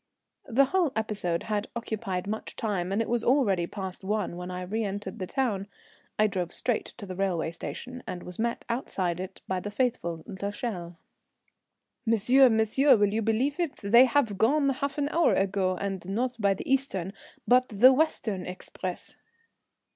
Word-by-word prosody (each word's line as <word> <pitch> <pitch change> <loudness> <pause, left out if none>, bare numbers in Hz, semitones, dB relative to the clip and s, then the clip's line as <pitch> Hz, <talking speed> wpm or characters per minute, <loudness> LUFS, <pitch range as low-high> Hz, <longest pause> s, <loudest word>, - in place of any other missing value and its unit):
The 270 +2 +4
whole 350 0 +1
episode 205 -6 -1
had 210 -2 -2
occupied 215 -5 -3
much 215 +2 -5
time, 195 -5 -2
and 210 +3 +1
it - - -8
was 235 -1 0
already 205 -10 +3
past 190 -1 -6
one 205 -3 -1
when 180 +1 -6
I 180 0 -4
reëntered 205 0 -3
the 185 - -3
town. 215 -7 -1 0.5
I 215 - +4
drove 185 -4 -1
straight 240 -2 -1
to 210 - -7
the 185 - -6
railway 180 -4 0
station, 250 +9 -7
and 175 - -5
was 180 +2 -9
met 235 +1 -1
outside 190 -8 -2
it 190 +1 -7
by 185 -1 -1
the 205 - -5
faithful 200 -8 -1
l'Echelle. 200 -3 -5 1.1
"Monsieur, 245 +4 +5
monsieur, 220 +6 +4
will 205 -1 +2
you 225 - +1
believe 240 - 0
it? 335 -5 -1
They 235 +6 +7
have 235 -6 +1
gone 275 +5 +3
half 275 +1 -2
an 290 -1 +1
hour 335 +1 +3
ago, 190 -1 +1
and 195 -1 -3
not 245 +5 -1
by 200 -2 +3
the - - -7
eastern 230 -9 0 0.3
but 255 +1 +4
the 240 +5 +7
western 235 - 0
express." 180 0 -6
210 Hz, 170 wpm, -28 LUFS, 190-250 Hz, 1.1 s, They